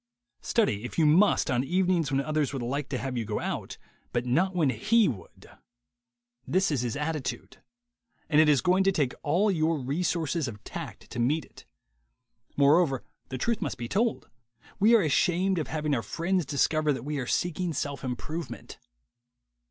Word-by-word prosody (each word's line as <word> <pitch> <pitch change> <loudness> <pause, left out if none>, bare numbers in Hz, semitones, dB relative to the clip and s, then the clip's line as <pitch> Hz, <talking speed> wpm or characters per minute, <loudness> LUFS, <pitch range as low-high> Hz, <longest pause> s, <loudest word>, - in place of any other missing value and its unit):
Study, 115 - +1
if 120 - -7
you 160 - +4
must, 170 +4 +4
on 125 0 +1
evenings 180 0 +1
when 135 0 +2
others 150 0 -1
would 135 -3 -3
like 140 +4 -3
to 135 - -2
have 130 0 -4
you 120 - -1
go - - -3
out, - - -4 0.3
but 120 0 -1
not 180 +10 +1
when 155 -7 +2
he 225 - +3
would. 110 -10 -7 1.0
This 185 -1 +2
is 140 -5 0
his 120 0 -2
attitude; 150 -3 -4 0.7
and 155 -1 +5
it 155 - +4
is 140 -4 +4
going 185 +5 +3
to 195 - +4
take 145 -9 0
all 185 +8 +2
your 160 -2 +1
resources 160 +2 -1
of 105 -3 -8
tact - - -8
to - - -5
meet 140 +5 +1
it. - - -17 0.9
Moreover, 145 -1 +4 0.3
the 130 - -4
truth 230 - -1
must 140 - -3
be 120 - -5
told: 220 - 0 0.5
we 220 +4 +6
are 220 - +4
ashamed 180 +4 +2
of 155 - -3
having 150 -2 -2
our 120 - +1
friends 170 +3 -1
discover 155 +2 +1
that 130 -1 -6
we 150 -1 -2
are 125 - -4
seeking 175 +3 -1
self 140 -2 -4
im 125 -1 -2
provement. 160 +6 -7
150 Hz, 180 wpm, -27 LUFS, 135-180 Hz, 1.0 s, we